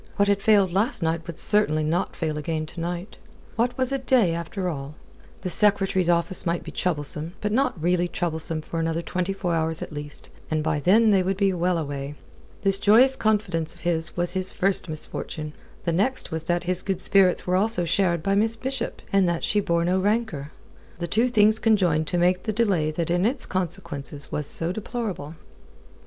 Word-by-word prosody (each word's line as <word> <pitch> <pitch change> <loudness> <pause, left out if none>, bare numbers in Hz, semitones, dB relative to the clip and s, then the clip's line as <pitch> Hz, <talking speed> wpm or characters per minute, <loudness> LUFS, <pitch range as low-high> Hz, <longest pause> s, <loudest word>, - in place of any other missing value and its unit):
What 200 - +2
had 200 0 +1
failed 200 -4 +3
last 205 +1 0
night 165 +1 -2
would 170 - -7
certainly 205 -8 +2
not 165 +4 -1
fail 155 -3 -2
again 155 +1 -3
to 160 - -10
night. 175 +3 -5 0.4
What 240 +2 0
was 260 0 +1
a 275 - -1
day, 250 -9 +2
after 170 +3 -4
all? 145 -3 -5 0.5
The 185 - -3
Secretary's 195 -3 +4
office 170 +1 +1
might 170 0 -2
be - - -8
troublesome, 155 -1 -1
but 210 - -2
not 255 -5 0
really 175 +2 +1
troublesome 160 -2 -2
for 165 - -5
another 165 +1 -1
twenty 180 +3 -2
four 190 -3 -2
hours 160 0 -1
at - - -9
least; 145 0 -5 0.2
and 155 -1 -1
by 155 -1 0
then 215 +8 +4
they 195 -2 +4
would 190 +1 -1
be 195 -1 +2
well 180 0 0
away. 145 -2 -5 0.5
This 195 -1 +4
joyous 240 +6 +5
confidence 185 -9 -1
of 170 - -14
his 165 -1 +1
was 175 0 0
his 190 0 +1
first 195 -2 +1
misfortune. 155 0 -5 0.3
The 170 - 0
next 215 +10 0
was 160 0 -4
that 175 0 0
his 180 0 +1
good 195 -2 -2
spirits 190 -1 +3
were 180 - 0
also 195 -2 +1
shared 170 -1 +1
by 195 - +1
Miss 220 +3 +3
Bishop, 260 +2 -4
and 195 -3 +3
that 170 -1 -2
she 210 - +1
bore 170 -4 0
no 185 +2 +1
rancour. 195 -8 -1 0.5
The 175 - -3
two 230 +7 +2
things 215 -2 +4
conjoined 180 -8 +2
to 175 - -1
make 180 +1 +2
the 215 - -3
delay 195 -9 +1
that 165 +2 -3
in 175 +1 +1
its 245 +5 0
consequences 170 -6 -4
was 150 -1 -3
so 165 +3 +4
deplorable. 200 - -5
180 Hz, 200 wpm, -24 LUFS, 165-205 Hz, 0.5 s, joyous